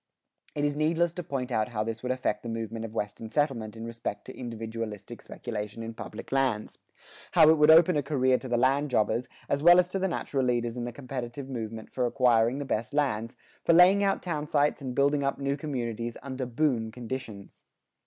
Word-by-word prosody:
It 145 Hz, -, 0 dB
is 145 Hz, 0 st, 0 dB
needless 165 Hz, +3 st, +1 dB
to 180 Hz, -, -5 dB
point 135 Hz, -4 st, -4 dB
out 110 Hz, -3 st, +1 dB
how 110 Hz, -3 st, -2 dB
this 115 Hz, +1 st, -4 dB
would 125 Hz, -, -2 dB
affect 125 Hz, -5 st, -1 dB
the 120 Hz, -, -6 dB
movement 115 Hz, 0 st, -4 dB
of 110 Hz, -, -8 dB
Western 105 Hz, +1 st, -4 dB
settlement 115 Hz, -6 st, -1 dB
in 115 Hz, -, -6 dB
respect 115 Hz, -3 st, -5 dB
to 130 Hz, -, -9 dB
individualistic 115 Hz, -2 st, -6 dB
speculation 110 Hz, -1 st, -6 dB
in 115 Hz, 0 st, -6 dB
public 105 Hz, -, -9 dB
lands; 130 Hz, -6 st, 0 dB, 0.5 s
how 155 Hz, -, +7 dB
it 160 Hz, -, +4 dB
would 150 Hz, +1 st, +6 dB
open 165 Hz, +2 st, +7 dB
a 145 Hz, -, +2 dB
career 130 Hz, -2 st, +2 dB
to 130 Hz, -, -7 dB
the 120 Hz, -1 st, +1 dB
land 135 Hz, +4 st, +2 dB
jobbers, 120 Hz, 0 st, +1 dB, 0.2 s
as 140 Hz, -, 0 dB
well 175 Hz, +3 st, +8 dB
as 180 Hz, 0 st, +3 dB
to 195 Hz, -, -2 dB
the 190 Hz, -, +1 dB
natural 140 Hz, -6 st, -2 dB
leaders 120 Hz, -2 st, 0 dB
in 120 Hz, -1 st, -3 dB
the 120 Hz, -, -4 dB
competitive 130 Hz, 0 st, -6 dB
movement 115 Hz, -4 st, -6 dB
for 125 Hz, -1 st, 0 dB
acquiring 120 Hz, -1 st, +3 dB
the 145 Hz, -, -4 dB
best 110 Hz, 0 st, -2 dB
lands, 115 Hz, -6 st, 0 dB, 0.3 s
for 170 Hz, -, +4 dB
laying 185 Hz, +4 st, +7 dB
out 195 Hz, -1 st, +1 dB
town 155 Hz, -4 st, -3 dB
sites 145 Hz, 0 st, +1 dB
and 130 Hz, -2 st, -5 dB
building 140 Hz, +1 st, +2 dB
up 140 Hz, -, 0 dB
new 140 Hz, 0 st, -1 dB
communities 120 Hz, -6 st, -4 dB
under 130 Hz, -2 st, -4 dB
"boom" 120 Hz, -3 st, 0 dB
conditions. 115 Hz, -4 st, -7 dB
125 Hz, 205 wpm, -28 LUFS, 115-145 Hz, 0.5 s, well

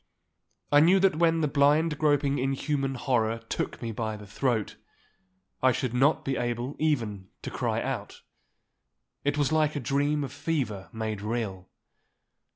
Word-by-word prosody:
I 145 Hz, -, +7 dB
knew 175 Hz, +6 st, +6 dB
that 190 Hz, -4 st, +3 dB
when 165 Hz, -1 st, +3 dB
the 155 Hz, -, +2 dB
blind 150 Hz, +2 st, +3 dB
groping 145 Hz, -2 st, +2 dB
inhuman 135 Hz, +1 st, -1 dB
horror 115 Hz, -3 st, +1 dB
took -, -, -3 dB
me 115 Hz, -, -2 dB
by 110 Hz, -1 st, -3 dB
the 105 Hz, -, -11 dB
throat, 110 Hz, +1 st, -1 dB, 0.9 s
I 130 Hz, -, +5 dB
should 125 Hz, 0 st, -2 dB
not 135 Hz, +5 st, +3 dB
be 135 Hz, -1 st, -1 dB
able 120 Hz, +3 st, -2 dB
even 115 Hz, -11 st, -1 dB, 0.2 s
to -, -, -5 dB
cry -, -, -1 dB
out. -, -, -5 dB, 1.0 s
It 145 Hz, +1 st, 0 dB
was 145 Hz, -1 st, +1 dB
like 155 Hz, -1 st, +2 dB
a -, -, -1 dB
dream 145 Hz, +3 st, 0 dB
of 135 Hz, -2 st, -6 dB
fever 140 Hz, -10 st, -2 dB
made 110 Hz, -2 st, -4 dB
real. 105 Hz, -4 st, -3 dB
135 Hz, 155 wpm, -28 LUFS, 115-150 Hz, 1.0 s, I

